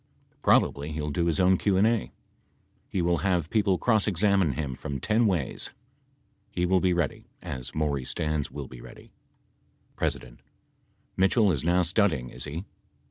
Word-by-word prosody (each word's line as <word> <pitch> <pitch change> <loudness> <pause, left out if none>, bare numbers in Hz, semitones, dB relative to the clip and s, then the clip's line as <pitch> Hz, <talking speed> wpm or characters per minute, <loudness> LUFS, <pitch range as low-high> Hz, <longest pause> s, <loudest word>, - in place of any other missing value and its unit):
Probably 75 +2 +2
he 80 - -4
will 75 0 -2
do 85 +3 0
his 80 - 0
own 95 0 +4
Q 100 -2 +2
and 100 - +4
A. 115 -1 +1 0.8
He 90 - -1
will 85 0 +2
have 90 -4 0
people 100 -4 +2
cross 110 -1 +2
examine 100 -4 +2
him 70 -2 -3
from 70 +2 -5
ten 110 - +2
ways. 85 -10 -2 0.8
He 90 - -1
will 95 +1 +3
be 90 0 +2
ready, 85 -4 -1
as 65 -2 -7
Maury 75 -4 -1
Stans 75 +1 -1
will 70 -2 -7
be 65 -2 -11
ready. - - -13 0.9
P. - - +2 1.1
Mitchell 95 +2 +4
is 70 -6 -1
now 90 +2 +3
studying, 85 - +1
is - - -6
he.? 80 +6 -5
85 Hz, 165 wpm, -27 LUFS, 75-95 Hz, 1.1 s, own